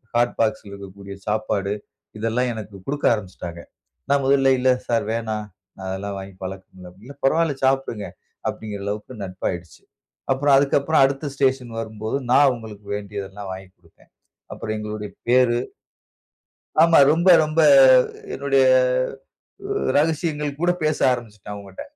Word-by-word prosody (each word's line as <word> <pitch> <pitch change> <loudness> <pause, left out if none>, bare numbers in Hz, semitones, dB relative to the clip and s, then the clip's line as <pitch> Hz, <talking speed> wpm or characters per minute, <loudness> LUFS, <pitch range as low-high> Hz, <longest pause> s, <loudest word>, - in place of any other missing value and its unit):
Hot 120 0 +2
பாக்ஸ்ல 110 -2 -1
இருக்கக்கூடிய 100 0 -10
சாப்பாடு 105 -2 -1 0.5
இதெல்லாம் 115 +3 0
எனக்கு 105 -2 -8
குடுக்க 145 +1 -3
ஆரம்பிச்சுட்டாங்க. 90 -5 -6 0.5
நான் 140 -1 +3
முதல்ல 135 -1 +4
"இல்ல 130 - +2 0.2
சார் 115 -3 +1
வேணாம், 110 -2 -3 0.4
அதெல்லா 95 +2 -4
வாங்கி 95 0 -10
பழக்கம் 95 0 -9
இல்ல". 90 -1 -11
"இல்ல, 140 - -10
பரவாயில்ல 160 +1 +2
சாப்டுங்க" 135 -6 0 0.4
அப்டின்கிற 105 -2 -6
அளவுக்கு 105 +2 -5
நட்பாயிடுச்சு. 90 -2 -5 0.5
அப்புறம் 140 +1 +3
அதுக்கு 140 0 +2
அப்புறம் 150 +1 +2
அடுத்த 135 +2 -2
ஸ்டேஷன் 130 -2 0
வரும்போது 110 +2 -4 0.2
நான் 145 +2 +6
அவுங்களுக்கு 110 -5 -4
வேண்டியதல்லாம் 100 -1 -7
வாங்கி 95 0 -8
குடுத்தேன். 85 -2 -26 0.4
அப்புறம் 110 - -5
எங்களுடைய 105 -1 -5 0.2
பேரு 120 -1 +4 1.2
ஆமா 165 -1 +6
ரொம்ப, 170 +3 +2 0.2
ரொம்ப 155 +1 0 0.7
என்னுடைய 135 -1 +2 1.4
ரகசியங்கள் 150 -1 -1
கூட 175 0 +3
பேச 155 -1 +1 0.2
ஆரம்பிச்சுட்டேன் 110 -4 -8
அவுங்கிட்ட. 100 -2 -9
110 Hz, 125 wpm, -22 LUFS, 100-135 Hz, 1.4 s, நான்